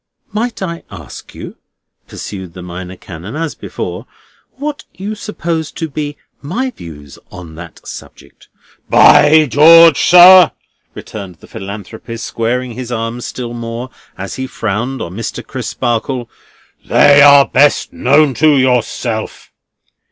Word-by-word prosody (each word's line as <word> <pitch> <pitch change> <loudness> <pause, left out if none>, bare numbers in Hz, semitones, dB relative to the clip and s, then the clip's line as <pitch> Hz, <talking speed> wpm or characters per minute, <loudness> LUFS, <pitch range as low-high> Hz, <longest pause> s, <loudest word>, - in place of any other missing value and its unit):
"Might 230 -1 -3
I 170 -2 -5
ask 85 -8 -12
you," - - -10 0.5
pursued 95 -4 -8
the 90 - -9
Minor 90 +1 -8
Canon 90 - -10
as 160 -1 -3
before: - - -7 0.5
"what 290 +1 -6
you 200 +3 -5
suppose 170 -7 -4
to 165 - -4
be 145 0 -5 0.2
my 240 - -3
views 75 - -12
on 85 -3 -11
that 85 0 -12
subject?" - - -12 0.4
"By 155 +1 +6
George, 160 +3 +6
sir!" 180 0 +8 0.4
returned 100 -4 -9
the - - -18
Philanthropist, 110 +3 -8
squaring 120 +3 -2
his 125 +1 -7
arms 115 +1 -4
still 120 -2 -6
more, 120 +2 -6 0.3
as - - -7
he 130 0 -4
frowned 120 +4 -3
on 85 - -8
Mr. 115 +3 -6
Crisparkle: 120 +1 -3 0.6
"they 145 0 +5
are 140 -1 +7
best 145 +2 +2
known 140 +2 +3
to 155 +3 +3
yourself." 125 -3 -2
125 Hz, 130 wpm, -14 LUFS, 105-155 Hz, 0.6 s, sir